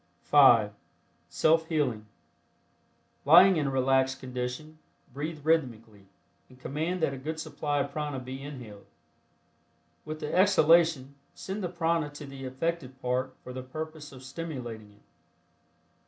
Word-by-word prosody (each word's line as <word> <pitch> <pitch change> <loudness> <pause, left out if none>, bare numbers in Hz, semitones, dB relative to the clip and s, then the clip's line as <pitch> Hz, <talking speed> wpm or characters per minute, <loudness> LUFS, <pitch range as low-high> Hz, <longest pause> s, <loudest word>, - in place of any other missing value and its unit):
(5) 120 -8 +6 0.6
SELF 160 +1 +2
HEALING. 130 -10 -1 1.2
Lying 175 +5 +7
in 145 -2 0
a - - 0
relaxed 135 0 +1
condition, 130 +5 -6 0.3
breathe 150 +2 -5
rhythmically, 115 -10 -1 0.4
and 130 0 -18
command 160 +6 -3
that 140 - +1
a 135 - -7
good 160 +4 -5
supply 145 -2 -3
of 140 - -4
prana 150 -1 -3
be 130 +1 -8
inhaled. 125 -8 -10 1.2
With 155 0 -6
the 150 -1 -5
exhalation, 165 -7 +4 0.2
send 195 +2 -5
the 180 - -2
prana 165 -3 0
to 145 - -8
the 135 -1 -9
affected 135 0 -3
part 130 +1 -2
for 125 - -8
the 130 - -5
purpose 155 +3 -7
of 130 -1 -12
stimulating 125 -8 -7
it. 105 - -26
140 Hz, 135 wpm, -28 LUFS, 130-160 Hz, 1.2 s, Lying